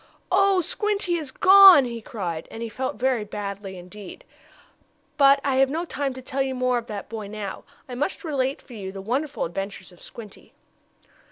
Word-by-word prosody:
"Oh, 390 0 +4
Squinty 400 -1 -1
is 305 -4 -5
gone!" 380 -2 +8
he 235 -1 -6
cried, 185 - -5
and 225 - -7
he 230 - -4
felt 260 +4 -4
very 250 0 0
badly 200 -2 -6
indeed. 190 - -11 0.9
But 280 -1 +5
I 270 -2 0
have 270 0 +4
no 325 +5 -2
time 280 -5 -3
to 260 - -9
tell 270 +1 -3
you 265 -1 -1
more 255 -1 +1
of 235 - -12
that 205 -2 -6
boy 215 -2 -6
now. 205 -1 -7 0.2
I 255 - -8
must 290 +12 -3
relate 275 -4 -2
for 255 - -14
you 195 -4 -6
the 195 - -8
wonderful 265 +9 -2
adventures 195 +2 -6
of 175 - -19
Squinty. 215 -4 -12
255 Hz, 185 wpm, -24 LUFS, 205-285 Hz, 0.9 s, gone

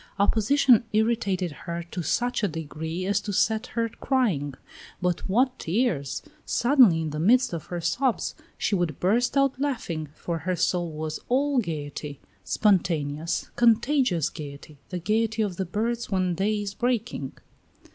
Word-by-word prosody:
Opposition 230 +4 +4
irritated 210 -5 +1
her 170 +3 -6
to 180 - -3
such 245 +10 0
a 205 - +2
degree 160 +1 -5
as 200 +1 +1
to 205 - -4
set 220 +4 +1
her 230 0 +2
crying. 205 - 0 0.4
But 180 +1 -1
what 250 +6 +2
tears! 165 - -1 0.2
Suddenly, 240 - +4
in 155 -2 -3
the 150 - -4
midst 245 +6 +4
of 165 - -4
her 175 -1 -4
sobs, 240 +9 0 0.2
she - - -1
would 175 -5 0
burst 235 +9 +2
out 275 -1 +2
laughing, 200 - -2
for 170 0 -3
her 180 +4 -1
soul 175 0 0
was 155 0 -4
all 275 +2 +2
gayety, 150 - -4 0.2
spontaneous, 165 -6 0
contagious 235 - +3
gayety, 145 -1 -9
the 180 - -3
gayety 220 +4 +1
of 190 -4 -3
the 190 - -1
birds 230 +6 -2
when 185 -3 +1
day 205 +4 0
is 200 -1 -4
breaking. 230 - -2
195 Hz, 150 wpm, -26 LUFS, 165-235 Hz, 0.4 s, Opposition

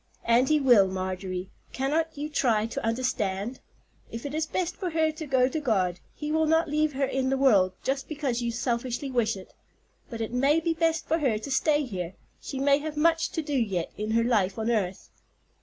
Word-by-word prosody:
"And 240 +3 +4
He 305 0 +4
will, 240 -8 +6
Marjorie; 185 0 -4 0.2
cannot 305 +4 -1
you 295 +1 -3
try 235 -8 +1
to 230 - -5
understand? 225 -2 -1 0.5
If 230 +3 -7
it 285 - -4
is 310 0 -1
best 350 +2 -2
for 370 - -3
her 320 -1 +1
to 310 0 -7
go 260 -2 +3
to 290 +4 -2
God, 190 - 0 0.2
He 300 0 -4
will 315 0 +2
not 320 +1 +3
leave 305 0 +1
her 275 +1 +1
in 265 0 -1
the 270 - +1
world 200 -9 +4
just 270 0 -1
because 280 -6 -2
you 235 0 -1
selfishly 240 +3 -2
wish 230 -4 +1
it. 190 - -12 0.6
But 230 - -6
it 225 +1 -3
may 275 +5 +3
be 330 0 0
best 325 -1 0
for 325 - +1
her 255 -8 +1
to 245 +6 -7
stay 295 +2 +2
here; 190 -7 -5 0.3
she 270 - -5
may 280 +1 +4
have 305 0 -5
much 330 +1 +3
to 320 - -2
do 295 -1 -4
yet 200 -10 0
in 210 +1 -4
her 230 +1 +2
life 205 -6 +1
on 220 +1 0
earth." 195 -5 -2
260 Hz, 210 wpm, -27 LUFS, 220-300 Hz, 0.6 s, will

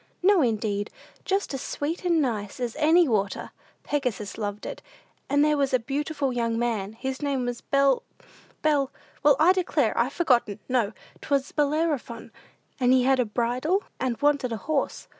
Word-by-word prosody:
"No, 390 -2 +5
indeed; 215 -4 0 0.4
just 390 -5 0
as 270 - -3
sweet 305 +6 -3
and 340 -2 +3
nice 220 -8 -2
as 240 -2 -3
any 325 +2 +5
water. 205 -5 -1 0.3
Pegasus 250 -8 -2
loved 205 -1 -4
it; - - -6 0.5
and 285 +1 +4
there 300 0 +3
was 275 -2 +2
a - - +5
beautiful 280 +2 -2
young 230 -1 0
man, 220 -4 -1
his 265 +4 -5
name 275 -3 -1
was 245 -1 -4
Bel 275 -1 +2 0.6
Bel 290 -3 +2 0.3
well, 290 -1 +6
I 345 +4 +6
declare, 325 - +1
I've 240 +3 +1
forgotten, 245 - +2
no, 235 -5 +1 0.3
'twas 280 -1 0
Bellerophon; 295 -5 -1 0.5
and 250 -1 +3
he 255 -1 +4
had 265 0 +3
a 250 - +3
bridle, 250 - 0 0.2
and 250 -3 -1
wanted 285 -4 +2
a 225 - -2
horse. 280 +7 -2
265 Hz, 165 wpm, -26 LUFS, 230-295 Hz, 0.6 s, well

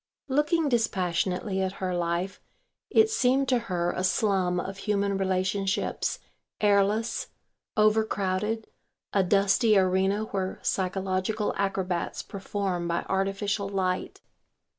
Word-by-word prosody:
Looking 295 +3 +2
dispassionately 190 -4 0
at 190 0 -1
her 185 -2 -3
life, 175 +2 -2 0.5
it 440 0 +5
seemed 270 - +2
to 250 -2 +3
her 175 -1 0
a 185 - -2
slum 185 -2 +1
of 195 +2 -5
human 200 -1 0
relationships, 190 +1 0 0.4
airless, 205 +2 +2 0.5
over 215 +1 +4
crowded, 210 +2 -1 0.5
a 195 - +4
dusty 200 +3 +3
arena 190 +2 +2
where 190 -3 -3
psychological 190 +2 -1
acrobats 190 -3 -2
perform 195 -3 -3
by 170 0 -1
artificial 195 +1 -1
light. 185 -2 -2
195 Hz, 110 wpm, -27 LUFS, 185-210 Hz, 0.5 s, it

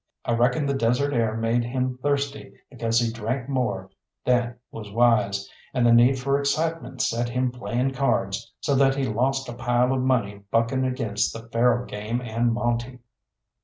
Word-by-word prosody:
I - - -1
reckon 125 +5 +2
the 140 - 0
desert 135 +3 +1
air 115 -3 +1
made 115 +1 +1
him 125 +1 -2
thirsty, 140 0 -2 0.2
because 115 -2 +1
he 115 -1 0
drank 120 +3 -3
more 105 -9 -2 0.3
than 120 -1 +2 0.2
was 105 -2 -8
wise, 110 -3 +2 0.3
and 125 -2 +2
the 120 - +6
need 120 +3 +6
for 140 +2 +1
excitement 155 +4 -1
set 120 +1 0
him 125 +1 0
playing 125 +1 -2
cards, 135 +1 -1
so 140 - 0
that 135 0 +4
he 140 - -1
lost 135 +3 0
a 120 - -5
pile 120 +1 +1
of 130 - 0
money 110 -6 0
bucking 115 +4 +1
against 115 -5 -1
the 115 0 -9
faro 120 +1 +2
game 105 +3 -3
and 120 0 0
monte. 120 +2 -1
120 Hz, 170 wpm, -25 LUFS, 115-130 Hz, 0.3 s, the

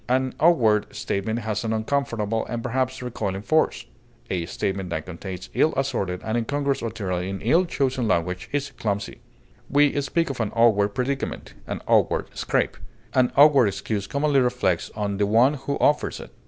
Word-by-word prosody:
An 130 0 +1
awkward 120 -11 +4
statement 105 +3 -2
has 110 0 -2
an 110 -1 -1
uncomfortable, 110 -2 -1
and 120 -1 -4
perhaps 130 +1 -1
recoiling 105 -5 -3
force; 155 +7 +1 0.5
a 85 -3 -1
statement 95 0 -3
that 80 -2 -3
contains 90 +1 -7
ill 160 - +2
assorted 95 -9 -1
and 110 - -2
incongruous 140 +4 -1
material 105 -6 -3
in 95 +2 -4
ill 165 - +3
chosen 130 -6 -1
language 90 -1 -1
is 140 -1 -2
clumsy. 100 -2 -3 0.5
We 145 0 +3
speak 165 +3 0
of 130 - -8
an 110 -3 -1
awkward 105 -3 +3
predicament, 135 +2 -3
an - - -4
awkward - - +1
scrape. - - 0 0.4
An 130 -1 +3
awkward 140 -5 +7
excuse 100 +1 -3
commonly 140 0 +2
reflects 125 -9 +1
on 100 -2 -2
the 100 0 +1
one 120 +7 +4
who 140 0 -3
offers 150 - +2
it. - - -10
115 Hz, 165 wpm, -24 LUFS, 100-135 Hz, 0.5 s, awkward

